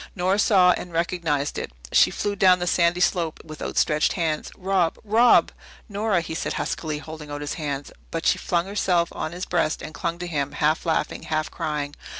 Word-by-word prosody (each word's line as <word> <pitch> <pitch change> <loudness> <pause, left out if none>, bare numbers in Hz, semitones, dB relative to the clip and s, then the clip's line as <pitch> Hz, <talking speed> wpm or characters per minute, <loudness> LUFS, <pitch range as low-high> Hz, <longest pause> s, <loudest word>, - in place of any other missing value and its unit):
Nora 190 +2 +1
saw 185 -4 +5
and 180 0 -3
recognized 165 -4 -1
it. - - -5 0.2
She - - +6
flew 205 -1 -2
down 185 -2 +5
the 175 - -3
sandy 175 0 +2
slope 170 -3 +1
with 155 -1 -10
outstretched 150 -1 +1
hands. 160 -4 -1
"Rob 185 -3 +1
Rob!" 225 +3 +5 0.4
"Nora!" 205 -3 0
he 160 - -6
said 160 - -2
huskily, 155 -2 -3
holding 155 0 -9
out 145 0 -5
his 145 - -3
hand. 145 -2 -4 0.2
But - - -4
she - - +3
flung 170 0 0
herself 185 -4 +1
on 155 - -4
his 180 +2 -5
breast 165 -3 0
and 155 - -7
clung 170 +2 -3
to 175 - -5
him, 145 -4 -2
half 155 +3 0
laughing, 160 -2 0
half 155 0 -2
crying. 145 -1 -3
170 Hz, 190 wpm, -24 LUFS, 155-180 Hz, 0.4 s, She